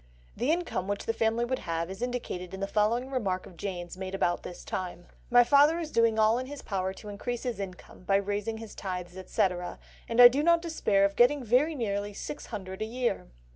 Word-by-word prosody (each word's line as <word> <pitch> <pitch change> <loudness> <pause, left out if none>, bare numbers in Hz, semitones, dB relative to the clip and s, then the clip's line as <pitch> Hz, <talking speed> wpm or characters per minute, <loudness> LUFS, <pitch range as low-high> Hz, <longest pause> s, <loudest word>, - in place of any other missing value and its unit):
The 250 - -1
income 330 - -1
which 205 0 -3
the 225 - 0
family 225 +1 +1
would 260 +1 -2
have 165 +1 -3
is 190 - -8
indicated 215 -7 -4
in - - -8
the 195 - -1
following 225 +6 +1
remark 195 -8 -1
of 180 - -13
Jane's 175 -1 -5
made 190 0 -4
about 175 -2 +1
this 175 - -9
time: 175 -2 -4 0.2
"My 245 0 +7
father 285 +6 +5
is 325 -3 -4
doing 230 -1 +3
all 220 +2 +4
in 255 - -5
his 285 0 -8
power 190 -2 -2
to 210 - -12
increase 235 +4 -4
his 240 -5 -3
income, 185 -2 -8
by 195 - +3
raising 205 +2 -1
his 225 -2 -9
tithes, 180 -2 -5
etc., 185 -1 -1 0.3
and 230 +1 -1
I 245 - +13
do 265 +4 +1
not 340 +2 +5
despair 210 -12 +2
of 200 0 -1
getting 260 +3 +4
very 255 +8 +3
nearly 205 -4 -2
six 295 - -6
hundred 190 -3 -6
a - - 0
year." 240 -1 -2
215 Hz, 215 wpm, -29 LUFS, 190-245 Hz, 0.3 s, I